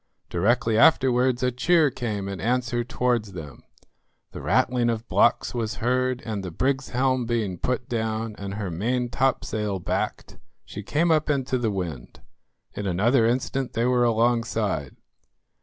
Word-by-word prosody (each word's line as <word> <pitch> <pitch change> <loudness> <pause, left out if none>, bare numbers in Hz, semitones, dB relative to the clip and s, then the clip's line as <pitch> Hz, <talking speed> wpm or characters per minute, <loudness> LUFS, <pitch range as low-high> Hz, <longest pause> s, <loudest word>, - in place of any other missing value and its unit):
Directly 115 +5 +2
afterwards 130 -2 +4
a 125 - +2
cheer 155 +4 +3
came 105 -6 -3
in 100 -2 -5
answer 120 +1 0
towards 120 -4 -1
them. 75 -7 -9 0.7
The - - -8
rattling 120 -1 +2
of 115 0 -3
blocks - - +2
was 115 -3 -2
heard, 125 +1 0
and 105 -4 -3
the 90 - -4
brig's 135 +9 -1
helm 130 -1 0
being 110 -7 -1
put 125 -1 -2
down, 110 -2 -2
and 100 0 -5
her 100 -4 -4
maintopsail 115 0 -1
backed, - - -3 0.3
she 105 - -7
came 160 - +1
up 155 -1 +2
into 135 -3 0
the 115 -2 0
wind. 85 -10 -5 0.5
In 105 - -4
another 115 +7 +3
instant 130 +2 -1
they 115 +1 0
were 125 -1 +3
alongside. 115 - 0
120 Hz, 145 wpm, -25 LUFS, 105-125 Hz, 0.7 s, afterwards